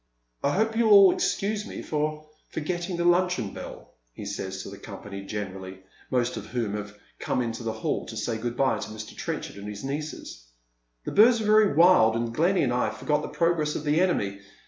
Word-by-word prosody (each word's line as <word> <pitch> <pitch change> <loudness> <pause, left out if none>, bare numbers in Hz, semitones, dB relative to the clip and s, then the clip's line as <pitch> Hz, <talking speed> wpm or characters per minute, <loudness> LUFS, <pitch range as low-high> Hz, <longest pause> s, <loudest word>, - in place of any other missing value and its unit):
" - - -42
I 140 - +2
hope 220 +2 +1
you'll 230 -1 +3
all 195 -2 +9
excuse 210 +1 -1
me - - -7
for 155 0 -2 0.2
forgetting 175 +3 -3
the 170 - 0
luncheon 175 - +2
bell," - - -9 0.2
he 105 - -8
says 95 -1 -4
to - - -8
the - - -10
company 100 -1 -8
generally, 95 -2 -6 0.3
most 125 -1 0
of - - -7
whom 115 -5 -2
have 105 0 -6 0.2
come - - -2
out 125 - +2
into 115 0 -4
the 115 -1 -2
hall 110 0 -3
to 110 - -7
say 110 +1 -2
good 120 +1 -4
bye 130 -5 +2
to - - -6
Mr. 110 0 -8
Trenchard - - -5
and 100 +1 -8
his 105 +2 -7
nieces. 140 - -6 0.3
" - - -47
The - - -3
birds 230 +3 +6
were 220 - -2
very 215 -5 +5
wild, 165 -10 +6
and 115 0 -2
Glenny 175 +7 +2
and 125 -3 +1
I 125 -3 +1
forgot 150 +7 -1
the - - -5
progress 165 -3 0
of - - -3
the 150 +3 +2
enemy. 100 - 0
125 Hz, 215 wpm, -26 LUFS, 105-175 Hz, 0.3 s, all